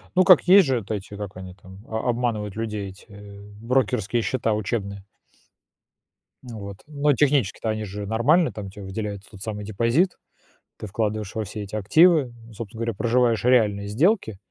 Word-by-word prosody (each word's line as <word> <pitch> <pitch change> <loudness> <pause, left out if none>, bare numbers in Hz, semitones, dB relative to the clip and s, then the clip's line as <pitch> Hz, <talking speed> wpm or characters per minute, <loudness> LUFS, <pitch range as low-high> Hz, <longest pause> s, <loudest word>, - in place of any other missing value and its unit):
Ну 185 - +6
как? 180 -2 +7
Есть 190 -4 +7
же 130 -2 +1
от 105 - -9
эти, 105 0 -5
как 100 -2 -7
они 95 -1 -9
там, 95 0 -15
о 110 +2 -2
обманывают 115 -4 -1
людей, 105 -3 -4
эти 95 +4 -15 0.5
брокерские 120 -2 0
счета 115 -2 -1
учебные. 100 -2 -3 1.4
Вот. 100 -5 -8
Ну 145 -1 +1
технически-то 130 -6 +1
они 110 0 -2
же 100 0 -6
нормальные, 140 - +3
там 100 -2 -7
те 100 +1 -11
выделяют 100 0 -5
тот 100 -2 -14
самый 105 -2 -5
депозит, 115 - +1 0.6
ты 110 - -7
вкладываешь 105 0 -3
во 110 - -1
все 105 +1 -6
эти 100 +2 -8
активы, 145 - +4 0.2
собственно 110 0 -8
говоря, 115 -1 -1
проживаешь 120 +1 +1
реальные 105 -5 +3
сделки 125 - +1
110 Hz, 160 wpm, -24 LUFS, 100-125 Hz, 1.4 s, как